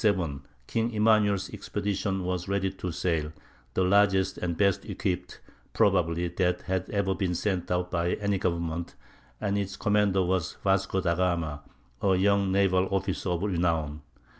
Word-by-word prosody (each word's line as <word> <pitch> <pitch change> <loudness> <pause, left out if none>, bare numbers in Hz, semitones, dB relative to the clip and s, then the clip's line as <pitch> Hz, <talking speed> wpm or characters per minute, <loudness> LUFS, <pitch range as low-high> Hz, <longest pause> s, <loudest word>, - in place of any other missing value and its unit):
] - - -6
In 110 - +6
1497 80 -8 -2 0.2
King 115 - -1
Emmanuel's 105 -3 +3
expedition 100 -1 -2
was 90 0 -2
ready 100 -1 0
to 95 -2 -5
sail—the 80 -4 -3
largest 95 0 +3
and 85 -2 -2
best 100 -2 +2
equipped, 90 0 -3 0.3
probably, 85 +1 +2
that 90 +1 0
had 95 -1 -2
ever 100 -2 0
been 90 -1 -1
sent 90 -1 -1
out 90 0 -1
by 85 0 0
any 100 -2 -1
government, 85 -1 -2 0.4
and 100 -1 0
its 95 -1 -4
commander 105 -2 +2
was 90 -1 -1
Vasco 95 -1 +1
da 85 -2 +1
Gama, 85 -5 -1 0.4
a 95 -1 +3
young 100 0 +2
naval 95 -1 +3
officer 95 -1 -1
of 90 +1 -1
renown. 85 -6 0
95 Hz, 155 wpm, -28 LUFS, 85-100 Hz, 0.4 s, In